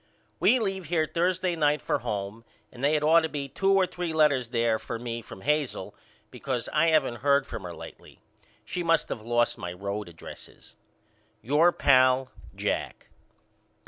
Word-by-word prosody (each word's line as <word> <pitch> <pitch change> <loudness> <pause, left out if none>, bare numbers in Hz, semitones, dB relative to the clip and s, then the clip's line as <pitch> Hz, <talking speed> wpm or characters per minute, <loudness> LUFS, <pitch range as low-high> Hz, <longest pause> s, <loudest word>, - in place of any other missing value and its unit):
We 245 +5 +5
leave 195 -5 -2
here 160 0 +1
Thursday 180 +2 0
night 150 -2 +2
for - - -1
home 105 -1 -4 0.3
and 125 +1 -11
they 145 +2 +3
had 150 - 0
ought 160 +2 +6
to 160 -1 -2
be 145 -2 -4
two 195 +8 0
or 195 -1 +4
three 175 -2 -4
letters 145 -6 +3
there 115 -2 +1
for - - -5
me 115 0 -5
from 95 -4 -12
Hazel 150 0 -1 0.4
because 125 -3 -4
I 155 +2 +3
haven't 155 -7 +2
heard 140 +1 +2
from 115 - -7
her 90 -2 -7
lately. - - -12 0.5
She 180 - -4
must 165 -1 +1
of 110 - -4
lost 120 +1 0
my 90 - -5
road 100 +2 -5
addresses. 85 - -13 0.7
Your 150 +8 +4
pal, 130 -3 +3 0.2
JACK. - - -3
140 Hz, 170 wpm, -27 LUFS, 115-165 Hz, 0.7 s, ought